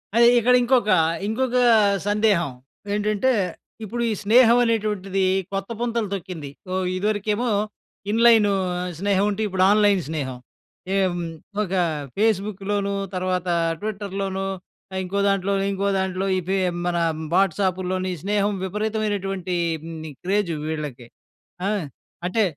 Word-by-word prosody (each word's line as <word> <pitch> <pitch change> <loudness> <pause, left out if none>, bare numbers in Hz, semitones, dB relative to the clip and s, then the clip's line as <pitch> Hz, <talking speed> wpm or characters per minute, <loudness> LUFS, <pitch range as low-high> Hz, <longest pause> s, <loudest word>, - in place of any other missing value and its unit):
అదే 235 0 +7
ఇక్కడ 240 +2 +4
ఇంకొక, 240 -3 +2 0.4
ఇంకొక 250 +3 0 0.5
సందేహం 205 -7 +2 0.4
ఏంటంటే, 210 +5 +1 0.5
ఇప్పుడు, 235 +3 -4
ఈ - - +1
స్నేహం 235 +2 +6
అనేటువంటిది 205 -4 0 0.3
కొత్త 195 +2 -3
పుంతలు 235 -4 -1
తొక్కింది. 170 -6 -6 0.2
ఓ - - -1 0.2
ఇదివరకేమో, 210 +4 0 0.6
ఇన్‍లైను 225 -2 +5 0.5
స్నేహం 200 0 +2
ఉంటే, 205 - -3
ఇప్పుడు 185 -1 +1
ఆన్‍లైన్ 205 -2 +4
స్నేహం. 135 -5 -3 0.6
ఎమ్ 180 -3 +1 0.4
ఒక 190 - -6 0.5
ఫేస్‌బుక్ 210 -2 0
లోను 200 -1 0 0.2
తర్వాత, 185 0 -1 0.3
ట్విట్టర్ 205 -2 -4
లోనూ, 195 0 -2 0.6
ఇంకోదాంట్లో, 200 +1 +1 0.2
ఇంకోదాంట్లో 190 -1 -1
ఇవే 190 +2 -1 0.3
మన 175 -1 0 0.4
వాట్సాప్ 190 0 +2
లోని, 185 0 -1
స్నేహం 205 0 +1
విపరీతమైనటువంటి 195 -2 -2 0.5
మ్ 160 - -8 0.2
క్రేజు 190 -3 0
వీళ్ళకి. 145 -6 -5 0.6
ఆ! - - +1 0.6
అంటే 220 +4 +2
200 Hz, 110 wpm, -23 LUFS, 185-215 Hz, 0.6 s, అదే